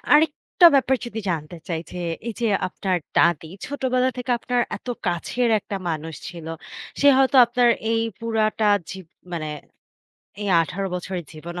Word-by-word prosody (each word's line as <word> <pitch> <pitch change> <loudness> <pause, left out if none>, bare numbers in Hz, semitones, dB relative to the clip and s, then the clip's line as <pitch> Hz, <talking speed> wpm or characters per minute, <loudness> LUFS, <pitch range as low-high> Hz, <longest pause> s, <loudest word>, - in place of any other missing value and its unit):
আরেকটা 315 +3 +5
ব্যাপার 265 -1 +3
যদি 225 -1 -5
জানতে 160 0 -4
চাই 165 -2 -1
যে, 180 - -7 0.3
এই - - -2
যে 235 - +1 0.2
আপনার 185 0 -1 0.2
দাদী 170 -2 +3 0.2
ছোটবেলা 260 -2 0
থেকে 250 0 -4
আপনার 245 +1 0 0.2
এত - - -14 0.2
কাছের 180 +8 0
একটা 200 - -5
মানুষ 160 0 -4
ছিল। 170 -2 -9 0.5
সে 285 - +6
হয়তো 270 0 +3
আপনার 240 0 +3 0.2
এই 225 - +2 0.2
পুরাটা 220 -2 +1 0.2
জীব 190 -3 -8 0.3
মানে 160 -3 -3 0.9
এই 205 - -2
১৮ 190 +5 -3
বছরের 180 0 -4
জীবনে 170 +3 -7
205 Hz, 150 wpm, -23 LUFS, 175-250 Hz, 0.9 s, সে